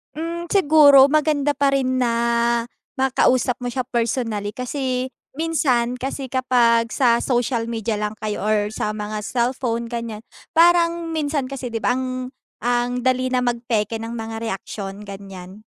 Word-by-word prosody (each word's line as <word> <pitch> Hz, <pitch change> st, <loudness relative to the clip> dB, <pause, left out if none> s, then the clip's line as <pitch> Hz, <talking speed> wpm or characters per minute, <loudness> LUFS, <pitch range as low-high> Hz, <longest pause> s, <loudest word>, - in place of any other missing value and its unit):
Hmm, 335 Hz, +2 st, -5 dB
siguro 290 Hz, -7 st, +7 dB
maganda 295 Hz, -1 st, +2 dB
pa 280 Hz, -1 st, +2 dB
rin 260 Hz, -2 st, +1 dB
na 235 Hz, -1 st, +1 dB, 0.8 s
makausap 255 Hz, -1 st, +2 dB
mo 245 Hz, -, -2 dB
siya 255 Hz, 0 st, -3 dB
personally 230 Hz, -3 st, -1 dB
kasi 255 Hz, +2 st, -3 dB, 0.2 s
minsan 265 Hz, -7 st, +1 dB
kasi 270 Hz, 0 st, -3 dB
kapag 240 Hz, -3 st, +2 dB
sa 235 Hz, -3 st, +2 dB
social 240 Hz, -2 st, 0 dB
media 225 Hz, -1 st, -2 dB
lang 210 Hz, 0 st, -3 dB
kayo 215 Hz, -1 st, -4 dB
or 210 Hz, 0 st, 0 dB
sa 210 Hz, -, -2 dB
mga 210 Hz, 0 st, -4 dB
cellphone 235 Hz, 0 st, -1 dB
ganyan 230 Hz, -2 st, -6 dB, 0.3 s
parang 335 Hz, 0 st, +3 dB
minsan 290 Hz, -3 st, -1 dB
kasi 255 Hz, -2 st, -6 dB
di 225 Hz, -, -3 dB
ba 245 Hz, -, +1 dB
ang, 255 Hz, 0 st, -4 dB, 0.3 s
ang 245 Hz, +1 st, -1 dB
dali 255 Hz, 0 st, +2 dB
na 250 Hz, -1 st, 0 dB
magpeke 230 Hz, -2 st, -1 dB
ng 225 Hz, -, -5 dB
mga 225 Hz, 0 st, -5 dB
reaksyon, 200 Hz, -1 st, -5 dB
ganyan. 195 Hz, 0 st, -10 dB
245 Hz, 145 wpm, -21 LUFS, 225-270 Hz, 0.8 s, siguro